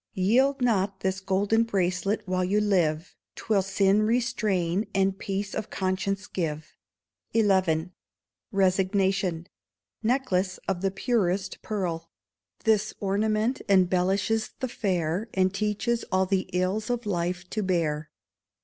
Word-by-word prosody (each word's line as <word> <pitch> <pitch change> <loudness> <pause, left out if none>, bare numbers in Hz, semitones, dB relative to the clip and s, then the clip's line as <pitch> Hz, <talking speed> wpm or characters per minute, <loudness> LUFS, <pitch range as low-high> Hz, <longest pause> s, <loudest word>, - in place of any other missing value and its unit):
_ - - -64
Yield 255 +8 +3
not 195 -5 +1
this 190 0 -1
golden 200 +4 +1
bracelet 195 0 0
while 185 0 0
you 195 +3 +2
live, 175 -6 +1 0.2
'Twill 210 -3 +1
sin 195 +2 +2
restrain, 215 -5 0
and 195 0 +1
peace 195 0 -3
of 215 -1 -4
conscience 190 +1 -1
give. 155 -5 -4 0.6
xi. 190 -7 +3 0.6
Resignation 190 -2 +1 0.6
Necklace 200 -6 0
of 190 -1 -2
Purest 195 -5 0
Pearl. 170 -6 -3 0.5
This 215 -1 +2
ornament 215 +4 0
embellishes 190 +3 +2
the 260 - -1
fair, 185 -2 -1
And 190 0 +2
teaches 215 +3 -1
all 190 0 +3
the 190 0 -1
ills 185 +5 -1
of 245 -1 -1
life 180 -2 -2
to 215 - -1
bear. 160 -5 -1
195 Hz, 120 wpm, -27 LUFS, 185-215 Hz, 0.6 s, Yield